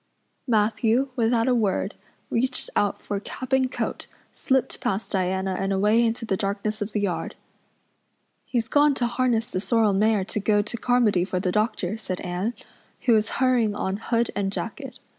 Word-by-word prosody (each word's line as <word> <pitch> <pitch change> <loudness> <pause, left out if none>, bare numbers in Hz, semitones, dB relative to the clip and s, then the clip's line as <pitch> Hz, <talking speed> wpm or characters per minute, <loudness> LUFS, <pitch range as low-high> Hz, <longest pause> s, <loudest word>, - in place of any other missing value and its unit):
Matthew, 225 +3 +2
without 230 0 +2
a 255 - +4
word, 205 -3 0 0.4
reached 255 +2 -1
out 205 - +1
for 200 - -3
cap 255 +5 -7
and 260 -1 +3
coat, - - -3 0.3
slipped 265 -1 0
past 195 +3 -1
Diana 190 0 0
and 195 +1 -1
away 210 +4 +3
into 230 0 -1
the 195 - 0
darkness 200 +2 -2
of 205 +1 -3
the 210 - 0
yard. 195 -3 -2 1.1
"He's 235 -3 -1
gone 290 -1 +4
to 245 - 0
harness 240 -1 +1
the 185 - -4
sorrel 220 -2 +2
mare 210 0 +2
to 210 - -3
go 205 0 +2
to 210 - -4
Carmody 235 -6 +2
for 185 0 -2
the 180 0 0
doctor," 210 -1 0
said 185 -4 -4
Anne, 185 +6 -2 0.5
who 240 - +3
was 220 0 +2
hurrying 245 -5 +2
on 190 0 -2
hood 230 +1 0
and 195 -1 -1
jacket. 255 +5 -6
220 Hz, 175 wpm, -25 LUFS, 200-240 Hz, 1.1 s, a